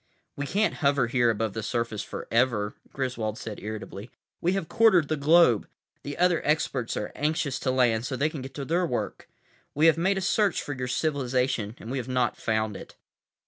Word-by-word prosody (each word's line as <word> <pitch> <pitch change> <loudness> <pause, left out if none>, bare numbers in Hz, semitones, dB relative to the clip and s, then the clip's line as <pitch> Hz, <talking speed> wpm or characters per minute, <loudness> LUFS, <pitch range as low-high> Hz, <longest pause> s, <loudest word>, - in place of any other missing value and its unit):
"We 145 0 -4
can't 210 +6 +1
hover 140 -3 +3
here 120 0 +2
above 110 -2 -1
the 110 - -3
surface 115 -1 -2
forever," 115 -4 0 0.2
Griswold 120 -5 -3
said 110 -4 -6
irritably. 105 0 -7 0.3
"We 175 +2 +2
have 195 -4 -2
quartered 215 -9 +4
the 155 - +1
globe. 150 -5 +4 0.3
The 145 0 -6
other 175 -1 +3
experts 140 -5 0
are 105 - -3
anxious 150 -2 -1
to 130 - -1
land, 125 -2 +2
so 130 - -3
they 140 +4 +1
can 155 -3 -7
get 135 +1 -9
to 140 - -4
their 170 +4 +1
work. 125 - -4 0.5
We 150 +3 +3
have 165 0 +5
made 190 +3 +2
a - - -1
search 200 0 +2
for 145 - -4
your 125 -1 -4
civilization 125 -6 0
and 115 - -8
we 135 - -1
have 120 - -5
not 125 -2 +1
found 110 -2 -1
it." - - -10
130 Hz, 195 wpm, -27 LUFS, 115-155 Hz, 0.5 s, have